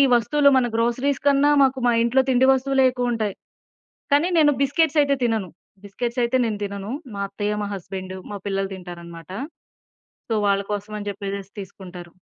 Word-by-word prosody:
వస్తువులు 280 +5 +4
మన 250 -2 +3
గ్రోసరీస్ 250 +4 0
కన్నా 285 +1 +4
మాకు 265 0 +2
మా 240 - +4
ఇంట్లో 255 +3 +3
తిండి 260 +1 +4
వస్తువులే 265 0 +2
ఎక్కువుంటాయి. 240 -5 -1 0.8
కానీ, 315 +5 +3
నేను 295 -2 +5
బిస్కెట్స్ 310 +2 +2
ఐతే 280 -1 +1
తినను. 220 -6 0 0.4
బిస్కెట్స్ 235 +5 -4
ఐతే 255 +2 +1
నేను 210 -2 -2
తినను. 200 +1 -5 0.2
మా 200 - -4
అత్తయ్య 205 +1 -3
మా - - -3
హస్బెండు 190 0 -7
మా 205 - -5
పిల్లలు 195 0 -2
తింటారనమాట. 170 -2 -10 1.0
సో, - - -2
వాళ్ళ 200 0 +2
కోసం 205 +1 -4
అని 205 0 -5
చెప్పేసేసి 200 0 -6
తీసుకుంటారు. 180 -2 -10
220 Hz, 155 wpm, -23 LUFS, 195-260 Hz, 1.0 s, నేను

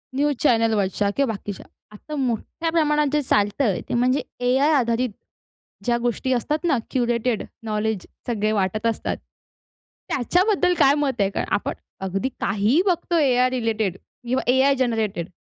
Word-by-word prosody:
News 290 +1 +1
चॅनेलवरच्या 220 -6 +2
किंवा 275 -4 +2
बाकीच्या. 205 -1 -7 0.3
आता 255 +8 -8
मोठ्या 265 +5 -2
प्रमाणात 300 -2 +2
जे 300 - +3
चालतं 205 -1 +1
आहे, 205 -8 +1
ते - - -2
म्हणजे 250 +3 +2 0.2
एआय 265 +5 +3
आधारित, 245 -2 +1 0.8
ज्या 240 -1 +2
गोष्टी 245 +2 0
असतात 295 +6 -1
ना, 305 -6 +3
क्युरेटेड 240 -2 0 0.2
नॉलेज 215 -2 -2 0.2
सगळे 215 -3 0
वाटत 210 +1 -1
असतात, 230 - -2 0.9
त्याच्याबद्दल 360 - +2
काय 275 - +6
मत 270 -6 0
आहे? 195 - +3
कारण, 195 - -3
आपण 205 - 0 0.3
अगदी 195 +7 -1
काहीही 215 - +2
बघतोय 345 -4 +2
एआय 250 +1 +3
रिलेटेड 225 -6 -1
किंवा 250 +5 -4
एआय 270 +2 +4
जेनरेटेड. 220 -8 -1
245 Hz, 145 wpm, -23 LUFS, 215-280 Hz, 0.9 s, काय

